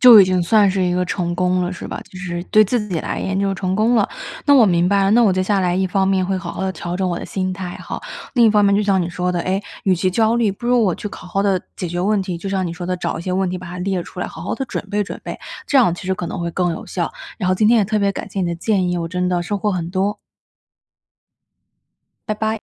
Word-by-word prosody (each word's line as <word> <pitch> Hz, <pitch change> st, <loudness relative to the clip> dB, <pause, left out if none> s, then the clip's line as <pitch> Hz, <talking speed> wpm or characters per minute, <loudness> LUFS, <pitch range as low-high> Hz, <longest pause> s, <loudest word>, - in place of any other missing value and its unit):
就 245 Hz, -5 st, +10 dB
已 195 Hz, -, +9 dB
经 185 Hz, -1 st, +1 dB
算 205 Hz, +3 st, +4 dB
是 190 Hz, 0 st, 0 dB
一 180 Hz, -1 st, +1 dB
个 180 Hz, 0 st, +1 dB
成 175 Hz, -1 st, -2 dB
功 180 Hz, 0 st, +1 dB
了， 175 Hz, -, -1 dB
是 -, -, -7 dB
吧？ -, -, -5 dB
就 185 Hz, -, -10 dB
是 175 Hz, -2 st, -4 dB
对 215 Hz, +3 st, +5 dB
自 210 Hz, 0 st, -1 dB
己 175 Hz, -4 st, -1 dB
来 -, -, -3 dB
言 190 Hz, 0 st, -1 dB
就 195 Hz, 0 st, +1 dB
成 185 Hz, -1 st, -2 dB
功 220 Hz, +3 st, +3 dB
了。 215 Hz, -4 st, +3 dB, 0.4 s
那 285 Hz, -, +6 dB
我 255 Hz, -4 st, +7 dB
明 175 Hz, -3 st, +3 dB
白 200 Hz, 0 st, +3 dB
了， 195 Hz, -, +3 dB
那 235 Hz, +2 st, +5 dB
我 210 Hz, -, +5 dB
接 185 Hz, 0 st, +1 dB
下 195 Hz, +1 st, +1 dB
来 180 Hz, -1 st, +1 dB
一 190 Hz, 0 st, +1 dB
方 190 Hz, +1 st, +1 dB
面 190 Hz, -1 st, +2 dB
会 190 Hz, 0 st, 0 dB
好 175 Hz, -2 st, -6 dB
好 -, -, -5 dB
地 190 Hz, 0 st, -1 dB
调 175 Hz, +1 st, -4 dB
整 190 Hz, -, 0 dB
我 175 Hz, -, -2 dB
的 -, -, -7 dB
心 185 Hz, -1 st, -2 dB
态 185 Hz, -1 st, -6 dB
吼。 -, -, -5 dB, 0.3 s
另 240 Hz, -3 st, +5 dB
一 -, -, +5 dB
方 210 Hz, -1 st, +4 dB
面 200 Hz, 0 st, +4 dB
就 210 Hz, -, +2 dB
像 195 Hz, -2 st, +2 dB
你 175 Hz, -, -3 dB
说 180 Hz, +1 st, -1 dB
的， 175 Hz, -1 st, -1 dB
诶， 190 Hz, +3 st, -1 dB, 0.2 s
与 190 Hz, -, +4 dB
其 185 Hz, +1 st, 0 dB
焦 225 Hz, +3 st, +2 dB
虑， 230 Hz, -3 st, +2 dB
不 200 Hz, +5 st, -7 dB
如 245 Hz, -1 st, +4 dB
我 190 Hz, -5 st, +2 dB
去 -, -, -6 dB
考 -, -, -10 dB
好 180 Hz, -, -15 dB
好 195 Hz, -, +2 dB
地 195 Hz, -3 st, +2 dB, 0.2 s
解 180 Hz, -, -3 dB
决 175 Hz, +1 st, -3 dB
问 200 Hz, +1 st, +2 dB
题。 180 Hz, -3 st, -4 dB
就 195 Hz, +3 st, -5 dB
像 190 Hz, -1 st, 0 dB
你 170 Hz, -, -4 dB
说 175 Hz, 0 st, -6 dB
的 185 Hz, 0 st, -1 dB
找 170 Hz, -1 st, -3 dB
一 165 Hz, -, -6 dB
些 185 Hz, -, -3 dB
问 190 Hz, 0 st, 0 dB
题 180 Hz, -, -3 dB
把 185 Hz, -, -9 dB
它 180 Hz, +1 st, -7 dB
列 190 Hz, -1 st, -1 dB
出 180 Hz, -, -12 dB
来， -, -, -1 dB
好 -, -, -9 dB
好 185 Hz, -, -2 dB
地 270 Hz, -, -3 dB
准 245 Hz, -, -4 dB
备 205 Hz, 0 st, 0 dB
准 -, -, -7 dB
备， -, -, -6 dB, 0.3 s
这 285 Hz, -, +2 dB
样 235 Hz, -10 st, +5 dB
其 180 Hz, -, -9 dB
实 190 Hz, -, +1 dB
可 180 Hz, -, -4 dB
能 175 Hz, -, -5 dB
会 170 Hz, 0 st, -2 dB
更 175 Hz, +1 st, 0 dB
有 -, -, -7 dB
效。 175 Hz, -3 st, -3 dB, 0.2 s
然 180 Hz, -, -2 dB
后 185 Hz, -, +3 dB
今 210 Hz, +3 st, +3 dB
天 235 Hz, -, +5 dB
也 215 Hz, -, +4 dB
特 215 Hz, +2 st, 0 dB
别 200 Hz, -1 st, +2 dB
感 205 Hz, -, -6 dB
谢 195 Hz, -, -3 dB
你 180 Hz, -, 0 dB
的 170 Hz, -, -1 dB
建 185 Hz, +1 st, 0 dB
议， 180 Hz, -, 0 dB
我 170 Hz, -, -2 dB
真 180 Hz, +1 st, -1 dB
的 175 Hz, -1 st, 0 dB
收 200 Hz, +3 st, -2 dB
获 210 Hz, -, 0 dB
很 175 Hz, -3 st, -3 dB
多。 195 Hz, +3 st, 0 dB, 2.1 s
拜 215 Hz, -, +1 dB
拜。 220 Hz, 0 st, -1 dB
190 Hz, 335 characters per minute, -20 LUFS, 180-205 Hz, 2.1 s, 就